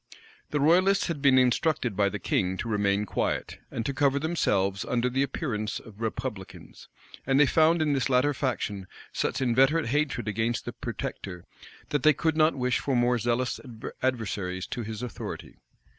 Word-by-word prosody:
The 150 - -1
royalists 185 +6 +4
had 155 -4 -3
been 135 -2 +5
instructed 125 -2 +2
by 100 0 +2
the 105 - -4
king 95 -1 0
to 120 - -4
remain 105 -1 +1
quiet, - - -2
and 115 - -4
to 140 - -1
cover 140 0 +2
themselves 100 - 0
under 125 +1 0
the 135 +2 +1
appearance 125 -6 -2
of 110 -1 -14
republicans; 115 -3 -6 0.4
and 135 0 +3
they 150 - +7
found 160 +3 +3
in 150 -2 +1
this 135 -1 0
latter 130 +3 +3
faction 110 -8 -3 0.3
such - - -1
inveterate 130 +4 +3
hatred 140 -4 0
against 110 +3 -1
the - - -5
protector, 90 -3 -6 0.4
that 145 - 0
they 155 +3 +6
could 160 +2 0
not 155 0 +3
wish 125 -2 0
for 135 - -1
more 120 0 +2
zealous 120 +2 0 0.4
adversaries 100 -7 -2
to 120 - -5
his 110 +1 -6
authority. 125 - -7
125 Hz, 170 wpm, -27 LUFS, 105-145 Hz, 0.4 s, they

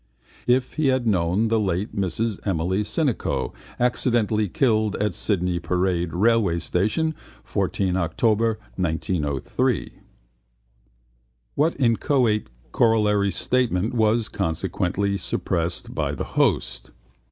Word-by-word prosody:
If 125 +1 +2
he 155 -2 +2
had 130 -2 +2
known 95 +1 +1
the 115 0 +2
late 95 0 -1
Mrs 100 +3 -1
Emily 95 +1 0
Sinico, 130 +4 -1 0.3
accidentally 115 -4 +1
killed 110 -2 +1
at 105 -2 -1
Sydney 90 -2 0
Parade 90 0 0
railway 105 -1 +2
station, 105 - 0 0.3
14 95 -2 -1
October 110 +5 +1 0.2
1903. 80 -5 -1 1.6
What 155 +1 +1
inchoate 115 - +2 0.2
corollary 105 -3 +3
statement 115 -2 0
was 110 -1 +2
consequently 95 +4 -1
suppressed - - -2
by - - -1
the - - -3
host? - - +1
105 Hz, 100 wpm, -23 LUFS, 90-115 Hz, 1.6 s, corollary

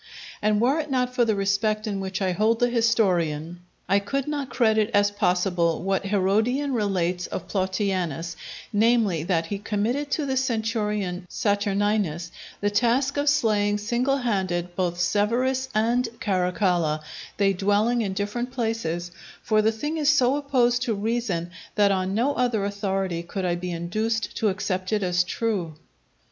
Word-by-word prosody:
And 210 0 +2
were 265 +7 +2
it 305 -1 -3
not 250 -2 0
for 245 -2 +3
the 220 -2 +1
respect 205 +2 0
in 205 -2 -2
which 190 0 -3
I 185 - +1
hold 220 +5 +2
the 245 0 +2
historian, 175 -9 +1 0.3
I 195 +2 +4
could 275 +7 -3
not 290 -3 -3
credit 220 -3 +2
as 205 0 +4
possible 180 -4 +1
what 195 +1 0
Herodian 220 +8 +1
relates 185 -5 0
of - - -6
Plautianus, 185 -4 -1 0.4
namely, 215 -5 +3
that 165 -1 0
he 200 +3 -4
committed 225 +8 -1
to 295 +1 -1
the 265 -1 -1
centurion 210 -7 -1
Saturninus 205 -5 0 0.3
the 205 0 +1
task 245 +6 +2
of 285 0 +2
slaying 210 -7 +2
single 240 +6 0
handed 185 -8 -1
both 175 -2 -1
Severus 235 +8 +1
and 235 +3 +2
Caracalla, 180 -5 +1 0.4
they 195 -1 +3
dwelling 205 +5 +2
in 200 -3 -2
different 210 +5 -3
places; 220 -9 -2 0.3
for 215 -1 +3
the 220 +1 +3
thing 295 +9 -3
is 295 -2 +2
so 270 -3 +4
opposed 250 -4 +2
to 240 -4 0
reason 200 -5 -2 0.2
that 205 -1 +4
on 190 0 0
no 255 +6 +2
other 240 -6 0
authority 195 -4 -2
could 185 +2 -4
I 175 - +1
be 175 +1 -4
induced 215 +7 -2
to 215 - +2
accept 185 0 -2
it 210 -2 +1
as 180 -1 +2
true. 185 -5 -2
205 Hz, 155 wpm, -25 LUFS, 185-235 Hz, 0.4 s, I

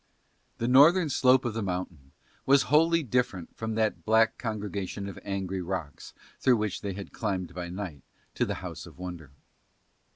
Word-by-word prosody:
The 115 - -1
northern 150 +6 +6
slope 130 -1 +4
of 120 - -1
the 115 - -2
mountain 90 -8 -4 0.4
was 140 0 +6
wholly 165 +2 +5
different 120 - -1
from 110 -1 -4
that 110 -1 0
black 110 +1 +3
congregation 100 -3 -4
of 100 - -8
angry 95 -2 -3
rocks 90 -5 -5 0.2
through 125 -2 +4
which 105 -2 -2
they 100 -2 -3
had 100 +1 -8
climbed 95 -5 -3
by 90 -1 -5
night 90 -6 -6 0.3
to - - 0
the - - -2
House - - -7
of - - -15
Wonder. 90 -5 -7
100 Hz, 165 wpm, -28 LUFS, 90-120 Hz, 0.4 s, northern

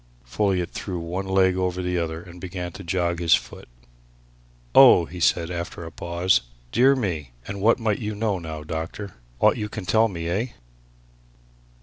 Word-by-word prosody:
Folliot 95 +5 0
threw 95 -3 -5
one 90 +3 -4
leg 95 -1 +3
over 90 0 -1
the 90 0 0
other 80 0 -3
and 90 -1 -13
began 90 -1 -5
to 100 - -10
jog 85 -1 -1
his 85 -2 +5
foot. - - -8 1.1
"Oh!" 130 -10 +8
he 90 +3 -9
said 85 0 +2
after 85 -1 -5
a 80 - -8
pause. 85 +3 +1 0.3
"Dear 130 +4 +5
me! 80 - -3
And 100 -1 -5
what 115 +3 +4
might 110 -4 0
you 105 -2 -4
know, 105 -3 -1
now, 80 -2 -6
doctor? 80 +5 -5 0.3
Aught - - +4
you 105 0 -3
can 105 -2 -6
tell 110 +4 +4
me 85 -5 -5
eh?" 100 +8 0
90 Hz, 175 wpm, -24 LUFS, 85-100 Hz, 1.1 s, Oh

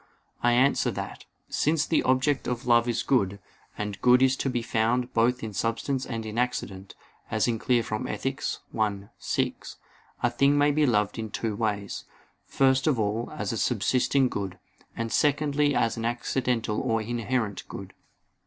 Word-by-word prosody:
I 120 0 +3
answer 130 +3 +3
that, - - -6 0.2
Since 155 0 +1
the 165 - +2
object 130 +2 +1
of 125 +1 -3
love 120 -1 +4
is 120 -1 0
good, 100 -7 +1 0.4
and 105 -1 -4
good 125 +1 +6
is 130 0 +4
to 135 - -1
be 120 -2 -1
found 120 +2 0
both 120 +2 +2
in 110 -2 -5
substance 115 +7 -1
and 115 -2 -4
in 110 +2 -3
accident, 95 -6 -3 0.3
as 110 +1 +1
is 115 -2 -1
clear 120 -2 +2
from 105 -1 -3
Ethic. - - -3 0.4
i, 100 -2 -1
6, - - -2 0.5
a 120 - +4
thing 140 +4 +3
may 145 0 +4
be 150 0 +2
loved 105 -2 +1
in 110 -1 -4
two 110 +1 -3
ways; 105 -2 -2 0.4
first 135 +1 +2
of 140 -7 +2
all 110 +2 -1
as - - -2
a - - -2
subsisting 125 +4 +2
good; 95 -5 -4 0.4
and 115 0 -2
secondly 145 0 +2
as 115 - +1
an 115 - -3
accidental 120 -2 -1
or 115 0 +1
inherent 115 -3 -2
good. - - -8
120 Hz, 170 wpm, -27 LUFS, 110-130 Hz, 0.5 s, good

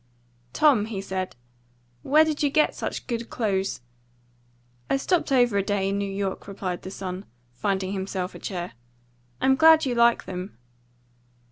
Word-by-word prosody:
"Tom," 270 - +4
he 215 -4 -4
said, 190 -1 -4 0.7
"where 310 - +5
did 310 -2 -2
you 290 - +3
get 305 +2 +3
such - - -5
good 235 -1 -4
clothes?" 195 - -1 1.1
"I - - +3
stopped 330 +2 0
over 245 -6 +4
a - - +1
day 195 -1 0
in 200 +1 -1
New 200 -1 -2
York," 195 -1 -3
replied 190 -3 -4
the - - -7
son, 190 -1 -5 0.3
finding 190 +6 -1
himself 190 -1 -3
a - - -10
chair. 180 -2 -4 0.7
"I'm 265 0 +4
glad 320 +1 +6
you 255 - 0
like 235 0 +4
them." 180 - -6
200 Hz, 155 wpm, -25 LUFS, 190-265 Hz, 1.1 s, glad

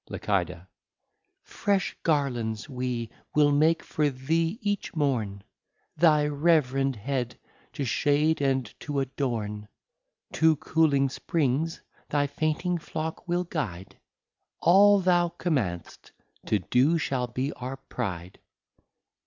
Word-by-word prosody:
Licida. 90 -3 -2 0.8
Fresh 200 -2 -1
Garlands 125 -8 0
we 125 -4 -3 0.2
will 145 -1 +5
make 160 +3 +3
for 150 -1 0
thee 160 +8 -1
each 205 -6 -3
morne, 115 -10 -1 0.5
Thy 150 -2 +4
reverend 140 -3 +2
Head 125 +2 -3 0.4
to 140 - -3
shade, 145 +5 +2
and 135 -2 +1
to 145 -2 -3
adorne; 115 -6 -3 0.7
To 160 0 +4
cooling 145 -2 +2
Springs 150 +2 -1 0.3
thy 145 -1 +2
fainting 155 +4 -1
Flock 160 +1 -5
we'll 175 +1 +1
guide, 110 - -5 0.6
All 200 +3 +6
thou 175 -1 +3
command'st, 110 - -2 0.4
to 105 - +3
do 125 - +2
shall 130 -5 -1
be 130 +4 -3
our 130 +2 -6
Pride. 95 -9 -5
140 Hz, 110 wpm, -27 LUFS, 125-160 Hz, 0.8 s, All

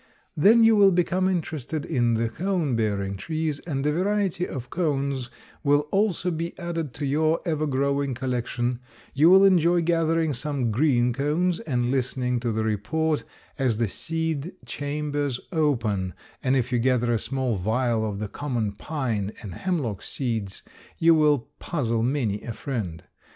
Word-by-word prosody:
Then 220 +9 +6
you 225 0 +6
will 200 -2 +7
become 180 +1 +1
interested 160 -4 -3
in 120 -7 +1
the 115 +1 +1
cone 165 +1 -1
bearing 100 -3 -1
trees 155 - -2
and 145 -4 -3
a 150 - +3
variety 190 +1 0
of 125 -2 -7
cones 140 -6 -1 0.3
will 145 0 +4
also 195 -3 +1
be 165 +1 -4
added 170 -5 -3
to 145 - -3
your 155 +3 +2
evergrowing 140 -4 0
collection, 120 -1 -2 0.3
you 150 +5 +5
will 190 +2 +8
enjoy 175 -2 +4
gathering 165 -2 +1
some 135 -2 -1
green 125 -1 +2
cones 160 +7 0
and 125 - -1
listening 125 -1 0
to 120 -1 -1
the 110 0 -1
report 150 +9 0 0.4
as 125 -5 +1
the 115 -1 +1
seed 160 - -3
chambers 145 -2 -2
open, 115 - 0 0.3
and 130 +1 +2
if 130 -1 0
you 120 - +2
gather 120 -1 +2
a 115 - +1
small 130 -3 -1
vial 110 +4 0
of 105 -2 -2
the 105 +1 -3
common 120 -4 -2
pine 110 -4 -3
and 100 -5 -6
hemlock 135 - -2
seeds 110 -7 -3 0.3
you 165 0 +5
will 150 -5 +3
puzzle 115 -8 -1
many 115 -5 0
a 115 - -5
friend. 105 - -4
140 Hz, 155 wpm, -25 LUFS, 120-160 Hz, 0.4 s, will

